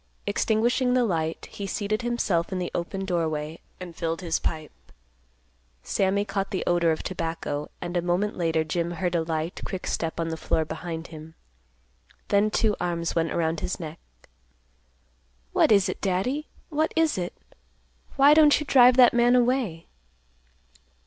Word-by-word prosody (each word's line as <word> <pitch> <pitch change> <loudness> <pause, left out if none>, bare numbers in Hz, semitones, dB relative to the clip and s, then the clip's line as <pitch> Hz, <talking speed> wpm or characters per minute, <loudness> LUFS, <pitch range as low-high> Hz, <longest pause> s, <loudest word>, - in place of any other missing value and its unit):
Extinguishing 235 +5 +1
the 250 - +3
light, 165 -5 -2
he 200 - -6
seated 210 +3 -2
himself 215 -8 0
in 190 - -2
the 180 -1 -3
open 190 +3 -3
doorway, 160 -3 -2 0.2
and 180 -2 -8
filled 165 +1 -3
his 170 -3 -1
pipe. 155 -1 -3 1.1
Sammy 200 +1 +1
caught 195 -1 -2
the 195 -3 -2
odor 170 -1 +2
of 155 - -3
tobacco, 165 -4 -4
and 175 0 -5
a 175 - +2
moment 180 +5 0
later 165 -2 +1
Jim 170 +2 -2
heard 180 0 -2
a 170 - +2
light, 160 +1 -3
quick 190 - -5
step 165 0 -2
on 165 0 -1
the 160 - -4
floor 160 0 0
behind 165 +1 -6
him. 160 0 -11 0.9
Then 205 +1 +3
two 215 -1 +1
arms 170 -1 -1
went 165 -1 0
around 165 -1 0
his 180 - -3
neck; 160 -1 -7 1.5
"What - - +4
is 200 -3 +5
it, - - -5
Daddy? 230 +11 -1 0.2
What 315 0 0
is 320 -1 +2
it? 175 0 -5 0.8
Why 280 +2 +7
don't 300 -2 +6
you 300 - -4
drive 250 -2 +6
that 250 -2 +7
man 240 +1 +4
away?" 240 -9 +1
180 Hz, 160 wpm, -26 LUFS, 165-215 Hz, 1.5 s, Why